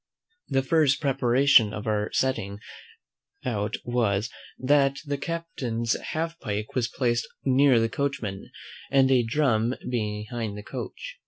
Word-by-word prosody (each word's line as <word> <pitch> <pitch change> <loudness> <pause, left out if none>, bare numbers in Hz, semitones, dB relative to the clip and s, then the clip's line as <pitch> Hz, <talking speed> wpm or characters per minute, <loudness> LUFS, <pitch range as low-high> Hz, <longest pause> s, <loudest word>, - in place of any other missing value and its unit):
The 135 -2 +1
first 150 -1 +3
preparation 135 -4 +4
for 105 - -8
our 105 0 0
setting 100 -7 -1 0.9
out 110 -3 -1
was, 115 -3 0 0.3
that 140 +1 +3
the 145 -1 -2
captain's 135 -9 -2
half 165 +1 -3
pike 105 -2 -4
was 125 -2 +1
placed 120 +1 0 0.2
near 135 -2 +5
the 115 - +2
coachman, 115 -6 -3 0.4
and 135 -1 +4
a 130 -2 +5
drum 120 -1 +1
behind 105 -1 -3
the 105 - -7
coach. - - -7
125 Hz, 130 wpm, -26 LUFS, 110-140 Hz, 0.9 s, near